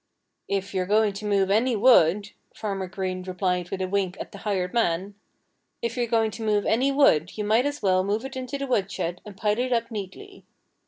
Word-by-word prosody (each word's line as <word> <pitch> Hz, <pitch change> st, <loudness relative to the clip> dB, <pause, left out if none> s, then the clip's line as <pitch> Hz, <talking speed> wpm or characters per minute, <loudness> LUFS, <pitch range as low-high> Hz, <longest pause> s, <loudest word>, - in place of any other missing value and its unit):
"If 195 Hz, 0 st, -2 dB
you're 185 Hz, -1 st, -1 dB
going 210 Hz, 0 st, +3 dB
to 210 Hz, +2 st, -6 dB
move 195 Hz, -2 st, +2 dB
any 230 Hz, +4 st, +3 dB
wood 205 Hz, -3 st, +4 dB
" -, -, -38 dB
Farmer 195 Hz, -3 st, -3 dB
Green 185 Hz, 0 st, -4 dB
replied 180 Hz, -1 st, -2 dB
with 190 Hz, -1 st, -3 dB
a -, -, -1 dB
wink 190 Hz, -1 st, -1 dB
at -, -, -7 dB
the 200 Hz, -, -10 dB
hired 190 Hz, -4 st, -2 dB
man 195 Hz, -3 st, 0 dB, 0.7 s
"if 235 Hz, 0 st, -3 dB
you're 240 Hz, -2 st, 0 dB
going 225 Hz, -1 st, +1 dB
to 225 Hz, +3 st, -7 dB
move 210 Hz, -1 st, +1 dB
any 255 Hz, +5 st, +2 dB
wood 195 Hz, -, +3 dB
you 210 Hz, -, -2 dB
might 225 Hz, +6 st, +3 dB
as 290 Hz, -3 st, -5 dB
well 185 Hz, -1 st, +3 dB
move 210 Hz, +5 st, -1 dB
it 265 Hz, 0 st, -7 dB
into 260 Hz, +1 st, -4 dB
the 275 Hz, -, -3 dB
woodshed 195 Hz, -7 st, -2 dB
and 200 Hz, -2 st, -10 dB
pile 210 Hz, +2 st, 0 dB
it 255 Hz, +1 st, -1 dB
up 230 Hz, -1 st, 0 dB
neatly." 220 Hz, -, -8 dB
205 Hz, 215 wpm, -25 LUFS, 190-230 Hz, 0.7 s, wood